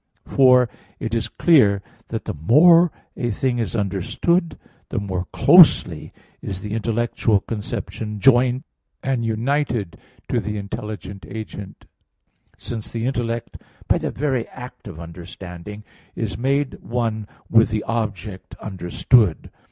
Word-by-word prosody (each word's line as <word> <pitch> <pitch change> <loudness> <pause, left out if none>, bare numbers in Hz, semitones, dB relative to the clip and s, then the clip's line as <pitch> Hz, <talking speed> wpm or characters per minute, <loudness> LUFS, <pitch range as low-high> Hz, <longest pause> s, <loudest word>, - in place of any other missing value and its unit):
For 125 -2 +5 0.3
it 115 - -4
is 115 -1 0
clear 105 - +4 0.2
that - - -5
the - - -3
more 165 - +6 0.2
a 120 - -2
thing 120 +2 0
is 115 0 -2
understood, 115 - 0 0.3
the - - -4
more 95 -3 -2
closely 145 - +6 0.3
is 95 -1 -5
the 105 -1 -5
intellectual 115 -1 +1
conception 105 0 -5
joined 125 +2 +4 0.4
and 130 -3 0
united 115 - -1 0.3
to - - +1
the 105 0 -3
intelligent 100 -2 -6
agent; 105 -3 -8 0.7
since 115 -3 -6
the 115 0 -3
intellect 120 -3 -3 0.3
by - - +3
the - - -2
very 130 -4 -1
act 125 -3 -11
of 85 -5 -9
understanding 90 +4 -9 0.3
is - - -3
made 135 +2 -1
one 115 -3 -2 0.2
with 115 0 +5
the 110 -1 -1
object 105 -4 -4
understood. 95 +1 +1
115 Hz, 125 wpm, -22 LUFS, 100-125 Hz, 0.7 s, more